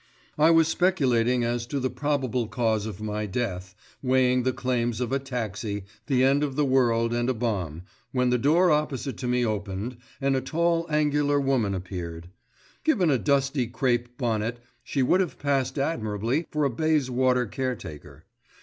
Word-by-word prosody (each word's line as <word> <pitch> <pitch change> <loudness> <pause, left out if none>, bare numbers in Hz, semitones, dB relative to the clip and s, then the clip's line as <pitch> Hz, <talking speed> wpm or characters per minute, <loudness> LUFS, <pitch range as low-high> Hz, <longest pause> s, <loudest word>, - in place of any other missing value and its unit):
I 155 +2 +6
was 165 -1 +5
speculating 125 -10 +2
as 120 0 -1
to 140 +2 -2
the 130 0 -1
probable 130 -5 -1
cause 110 -2 0
of 105 0 -7
my 105 0 -2
death, 95 -3 -3 0.3
weighing 130 -1 +3
the 130 +1 +1
claims 120 -3 -1
of 125 -1 -2
a 135 - +1
taxi, 110 -6 -4 0.2
the 130 -3 +3
end 140 +2 +3
of 140 -3 -2
the 150 0 +2
world 120 -3 +2
and 120 +1 0
a 130 - 0
bomb, 95 -9 -2 0.3
when 125 -1 +1
the 125 - +2
door 165 +7 +4
opposite 150 -3 -1
to 125 - -4
me 125 0 +2
opened 105 +2 -3 0.2
and 135 -1 +1
a 130 - +1
tall 170 +4 0
angular 145 -1 +2
woman 130 -8 +1
appeared. 90 -2 -6 0.5
Given 195 - +3
a 130 - +2
dusty 140 -2 +1
crape 120 -1 -1
bonnet, 115 -2 -1 0.3
she 130 +2 0
would 180 +9 +3
have 185 -4 -1
passed 135 -1 0
admirably 120 0 -1
for 150 0 -1
a 140 - +2
Bayswater 130 -3 +1
caretaker. 120 - -6
125 Hz, 170 wpm, -26 LUFS, 115-140 Hz, 0.5 s, I